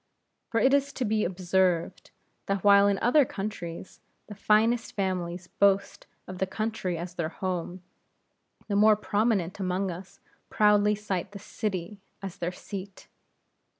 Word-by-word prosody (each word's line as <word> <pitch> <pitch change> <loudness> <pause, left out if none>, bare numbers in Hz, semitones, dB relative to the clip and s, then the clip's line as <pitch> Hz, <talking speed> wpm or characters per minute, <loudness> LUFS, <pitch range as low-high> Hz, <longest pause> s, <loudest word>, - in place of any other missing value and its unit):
For 230 - +1
it 265 +3 +4
is 280 0 +2
to 255 - -2
be 215 0 +1
observed, 180 -1 0 0.4
that 195 -2 -1
while 200 0 +6
in 200 -1 +2
other 270 +5 +5
countries, 195 -6 -6 0.3
the 210 - -9
finest 220 +3 +2
families 185 -3 -2
boast 200 +2 +1 0.2
of 185 0 -8
the 190 - 0
country 215 -4 -3
as 175 +1 -6
their 170 -3 -2
home; 180 0 -4 0.8
the 205 - -1
more 215 +1 +6
prominent 205 -3 0
among 185 0 -1
us, 185 +2 -10 0.3
proudly 210 0 +4
cite 200 -2 -4
the - - -6
city 200 -1 -4 0.2
as 195 -2 -7
their 175 +1 -2
seat. 195 +1 -9
195 Hz, 145 wpm, -27 LUFS, 180-210 Hz, 0.8 s, while